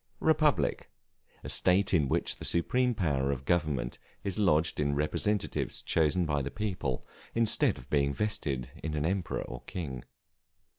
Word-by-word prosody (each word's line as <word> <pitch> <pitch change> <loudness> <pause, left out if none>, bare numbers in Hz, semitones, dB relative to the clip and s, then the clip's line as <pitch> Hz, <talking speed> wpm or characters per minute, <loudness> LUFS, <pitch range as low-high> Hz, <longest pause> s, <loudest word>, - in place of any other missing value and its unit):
Republic, 155 -2 +2 0.5
a - - -6
state 95 +2 +3
in 75 -6 +3
which - - +1
the - - -9
supreme 125 +8 +2
power 70 -8 0
of 70 -1 -4
government 75 -8 0 0.2
is 100 0 -2
lodged 80 -6 +2
in 70 -1 +1
representatives 95 +7 -1
chosen 80 +2 +1
by 75 -2 0
the 70 - -3
people, 80 -6 -3 0.3
instead 115 -1 +4
of - - -12
being 70 -1 +2
vested 70 - -1
in 80 -1 -3
an 75 0 -1
emperor 95 +1 -1
or 60 - -8
king. 70 -9 -5
80 Hz, 150 wpm, -30 LUFS, 70-100 Hz, 0.5 s, instead